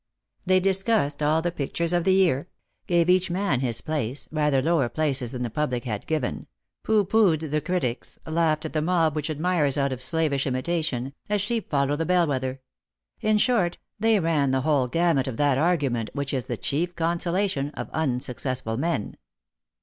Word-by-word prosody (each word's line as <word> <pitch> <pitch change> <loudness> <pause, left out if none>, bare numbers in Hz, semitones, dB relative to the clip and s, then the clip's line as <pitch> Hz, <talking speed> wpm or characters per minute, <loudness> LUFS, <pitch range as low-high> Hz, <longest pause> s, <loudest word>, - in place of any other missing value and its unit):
They 185 0 +5
discussed 195 -5 +1
all 155 +2 +2
the 175 - 0
pictures 170 +3 -2
of 175 -1 +1
the 190 - +4
year; 175 -4 +2 0.4
gave 170 -1 +3
each 185 0 +3
man 180 -6 0
his 125 -4 0
place, 140 -3 -3
rather 150 -3 +2
lower 140 -3 +1
places 135 -6 0
than 125 -2 -4
the 120 - -2
public 125 -3 -1
had 105 -4 -4
given; 130 - -2 0.3
pooh 215 -2 +2
poohed 175 -8 +2
the 150 0 +1
critics; 145 -8 -2
laughed 160 -1 +1
at 155 - -5
the 155 - +1
mob 165 -2 +2
which 150 +1 -2
admires 155 -2 +1
out 140 -1 +1
of 130 -1 -3
slavish 150 -2 +1
imitation, 135 -1 -2 0.2
as 210 0 +1
sheep 220 +2 -2
follow 140 0 +1
the 160 +2 -2
bell 180 -1 +4
wether; 130 -2 -2 0.6
in 215 0 +2
short, 210 -7 +2 0.2
they 220 0 +3
ran 160 -5 +1
the 130 0 +1
whole 140 -3 +2
gamut 165 -1 +1
of 125 -4 -4
that 145 -2 +2
argument 140 -9 +1
which 140 -1 -3
is 130 -3 -1
the 120 - -3
chief 175 +9 -2
consolation 170 -2 0
of - - -5
unsuccessful 125 -4 -2
men. 160 -7 -2
155 Hz, 180 wpm, -25 LUFS, 135-175 Hz, 0.6 s, They